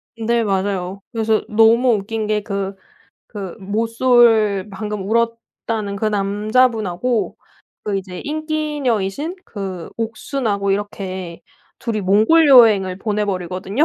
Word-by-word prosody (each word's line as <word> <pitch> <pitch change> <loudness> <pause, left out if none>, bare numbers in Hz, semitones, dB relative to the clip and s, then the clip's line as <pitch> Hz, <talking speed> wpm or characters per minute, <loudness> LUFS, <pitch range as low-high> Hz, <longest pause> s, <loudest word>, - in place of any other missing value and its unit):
네 230 +1 0
맞아요. 195 -1 -2
그래서 220 -2 +1
너무 230 +3 +4
웃긴 215 +2 -3
게 210 0 0
그, 200 -1 -4 0.5
그 195 -5 -7
모쏠 225 -1 +3
방금 210 -1 -5
울었다는 230 -2 -2
그 200 - -2
남자분하고 215 +1 0 0.5
그 205 -2 -1
이제 185 -2 -8
인기녀이신 300 - -2
그 190 -5 -6
옥순하고 225 -3 -2
이렇게 190 -3 -4 0.4
둘이 225 -3 -2
몽골 215 - +4
여행을 215 -8 +6
보내버리거든요. 195 - -1
210 Hz, 250 characters per minute, -19 LUFS, 195-230 Hz, 0.5 s, 여행을